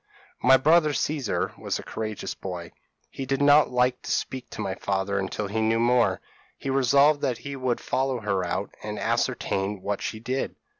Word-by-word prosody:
p> -, -, -1 dB
"My 130 Hz, +1 st, +8 dB
brother 155 Hz, +2 st, +4 dB
Caesar 145 Hz, -4 st, -1 dB
was -, -, -2 dB
a -, -, -8 dB
courageous 110 Hz, -2 st, -4 dB
boy; 90 Hz, -3 st, -7 dB, 0.4 s
he 135 Hz, -, -5 dB
did 135 Hz, 0 st, 0 dB
not 145 Hz, +1 st, +6 dB
like 125 Hz, 0 st, +1 dB
to -, -, -8 dB
speak 130 Hz, -1 st, -2 dB
to -, -, -10 dB
my 95 Hz, -, -2 dB
father 100 Hz, 0 st, -1 dB
until 100 Hz, +2 st, -3 dB
he 110 Hz, +3 st, -1 dB
knew 110 Hz, +1 st, +2 dB
more. 120 Hz, -5 st, +3 dB, 0.4 s
He 135 Hz, -, -3 dB
resolved 140 Hz, +3 st, +4 dB
that 125 Hz, -3 st, 0 dB
he 140 Hz, +4 st, -7 dB
would 130 Hz, -2 st, -1 dB
follow 130 Hz, -2 st, -1 dB
her 100 Hz, -3 st, 0 dB
out, 85 Hz, -, -3 dB
and -, -, -5 dB
ascertain 95 Hz, 0 st, -1 dB
what 100 Hz, -1 st, -2 dB
she 110 Hz, -, -4 dB
did. 130 Hz, +4 st, -3 dB
120 Hz, 190 wpm, -26 LUFS, 100-135 Hz, 0.4 s, My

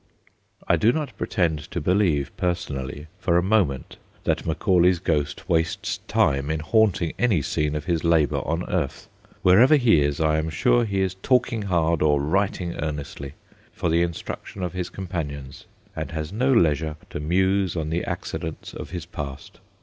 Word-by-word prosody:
I -, -, +4 dB
do 115 Hz, -, +4 dB
not 140 Hz, -5 st, -3 dB
pretend 80 Hz, -8 st, -1 dB
to -, -, -3 dB
believe, 85 Hz, -5 st, +1 dB
personally, 75 Hz, -5 st, -3 dB
for 85 Hz, -2 st, +2 dB
a 85 Hz, -, +3 dB
moment, 95 Hz, -10 st, 0 dB, 0.3 s
that -, -, -1 dB
Macaulay 90 Hz, +2 st, +3 dB
's -, -, -4 dB
ghost 75 Hz, -4 st, -2 dB
wastes 80 Hz, 0 st, 0 dB
time 70 Hz, +1 st, +2 dB
in 80 Hz, 0 st, -1 dB
haunting 90 Hz, -1 st, +2 dB
any 105 Hz, -12 st, +2 dB
scene 75 Hz, +2 st, -1 dB
of 75 Hz, -, -4 dB
his 85 Hz, -3 st, 0 dB
labour 80 Hz, -3 st, +2 dB
on 85 Hz, +3 st, -2 dB
earth. -, -, -2 dB, 0.4 s
Wherever 115 Hz, +11 st, +7 dB
he 120 Hz, -, +4 dB
is, 70 Hz, 0 st, 0 dB
I 80 Hz, -1 st, +2 dB
am 80 Hz, +1 st, -2 dB
sure 115 Hz, +10 st, +2 dB
he 100 Hz, -3 st, -1 dB
is 95 Hz, -1 st, 0 dB
talking 125 Hz, -3 st, +2 dB
hard, 85 Hz, -4 st, +1 dB
or 75 Hz, -2 st, +3 dB
writing 90 Hz, +3 st, -1 dB
earnestly, 75 Hz, -2 st, -5 dB, 0.4 s
for 85 Hz, -, -1 dB
the 85 Hz, +1 st, +3 dB
instruction 85 Hz, +2 st, -4 dB
of 90 Hz, -, -3 dB
his 90 Hz, -1 st, -3 dB
companions, 75 Hz, -8 st, -6 dB, 0.3 s
and -, -, -4 dB
has 80 Hz, +2 st, -5 dB
no 125 Hz, +5 st, +2 dB
leisure 80 Hz, -, +2 dB, 0.2 s
to -, -, -4 dB
muse 95 Hz, +4 st, +1 dB
on 80 Hz, -2 st, -2 dB
the 85 Hz, +2 st, -1 dB
accidents 80 Hz, -1 st, -5 dB
of -, -, -7 dB
his 85 Hz, -3 st, -5 dB
past. 70 Hz, -5 st, -8 dB
85 Hz, 170 wpm, -24 LUFS, 75-95 Hz, 0.4 s, Wherever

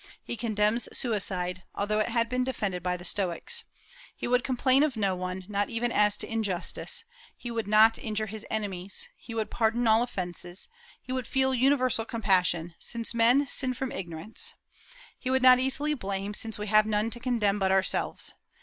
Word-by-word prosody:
He -, -, -5 dB
condemns 220 Hz, 0 st, 0 dB
suicide, 185 Hz, -5 st, 0 dB
although 210 Hz, +1 st, 0 dB
it 215 Hz, -, 0 dB
had 230 Hz, -1 st, +1 dB
been 250 Hz, +1 st, 0 dB
defended 205 Hz, -8 st, -2 dB
by 180 Hz, 0 st, -1 dB
the 175 Hz, -, -8 dB
Stoics. 195 Hz, -, +1 dB, 0.5 s
He -, -, -4 dB
would 245 Hz, 0 st, +2 dB
complain 260 Hz, +1 st, +2 dB
of 295 Hz, -6 st, +1 dB
no 195 Hz, -3 st, +1 dB
one, 185 Hz, 0 st, -5 dB
not 205 Hz, -1 st, -1 dB
even 235 Hz, +1 st, -1 dB
as 210 Hz, -1 st, +3 dB
to -, -, -1 dB
injustice; 220 Hz, -, 0 dB, 0.3 s
he 240 Hz, -, -6 dB
would 225 Hz, -3 st, -3 dB
not 215 Hz, +2 st, +5 dB
injure 215 Hz, -1 st, -2 dB
his 215 Hz, +1 st, -7 dB
enemies; 200 Hz, -, -4 dB
he 230 Hz, -, -10 dB
would 220 Hz, -1 st, -2 dB
pardon 235 Hz, +1 st, +1 dB
all 220 Hz, 0 st, +5 dB
offences; 180 Hz, -5 st, -3 dB, 0.3 s
he -, -, -10 dB
would 255 Hz, -3 st, -2 dB
feel 265 Hz, -1 st, +1 dB
universal 255 Hz, -2 st, +2 dB
compassion, 180 Hz, -7 st, +1 dB
since 230 Hz, 0 st, 0 dB
men 240 Hz, +5 st, +4 dB
sin 255 Hz, -1 st, -1 dB
from 265 Hz, +1 st, -3 dB
ignorance; 195 Hz, -, -3 dB, 0.7 s
he 255 Hz, -, -4 dB
would 260 Hz, 0 st, +2 dB
not 255 Hz, -1 st, +8 dB
easily 275 Hz, +3 st, 0 dB
blame, 200 Hz, -5 st, -4 dB
since 225 Hz, +1 st, -1 dB
we 210 Hz, -, -4 dB
have 215 Hz, +1 st, +4 dB
none 215 Hz, +1 st, 0 dB
to 240 Hz, -, -4 dB
condemn 225 Hz, -5 st, +1 dB
but 190 Hz, -1 st, +2 dB
ourselves. 190 Hz, 0 st, +1 dB
220 Hz, 180 wpm, -28 LUFS, 195-250 Hz, 0.7 s, not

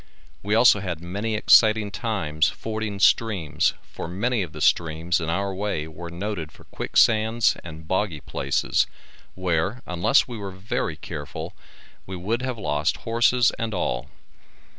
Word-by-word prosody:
We 105 Hz, +2 st, 0 dB
also 115 Hz, -2 st, +6 dB
had 90 Hz, -5 st, -4 dB
many 100 Hz, +6 st, -3 dB
exciting 110 Hz, -1 st, +5 dB
times 80 Hz, -10 st, 0 dB
fording 110 Hz, -2 st, -4 dB
streams 100 Hz, -8 st, +2 dB
for -, -, -8 dB
many 105 Hz, +7 st, -1 dB
of 90 Hz, -5 st, -4 dB
the 75 Hz, -, -9 dB
streams 85 Hz, +3 st, +1 dB
in 80 Hz, -, -2 dB
our 100 Hz, +3 st, -1 dB
way 95 Hz, -6 st, -2 dB
were 85 Hz, +2 st, -8 dB
noted 85 Hz, -2 st, -4 dB
for -, -, -17 dB
quicksands 110 Hz, +1 st, +2 dB
and 80 Hz, -1 st, -10 dB
boggy 95 Hz, -5 st, -1 dB
places, 70 Hz, 0 st, 0 dB, 0.5 s
where, 95 Hz, +6 st, -1 dB
unless 90 Hz, +10 st, +2 dB
we 120 Hz, -3 st, -7 dB
were 100 Hz, -1 st, -5 dB
very 95 Hz, -1 st, -3 dB
careful, 75 Hz, -2 st, -7 dB, 0.5 s
we 95 Hz, -, -5 dB
would 105 Hz, +7 st, -2 dB
have 130 Hz, -2 st, -3 dB
lost 75 Hz, -3 st, 0 dB
horses 120 Hz, +2 st, +3 dB
and 115 Hz, -2 st, -2 dB
all. 65 Hz, -6 st, -2 dB
95 Hz, 145 wpm, -24 LUFS, 80-110 Hz, 0.5 s, also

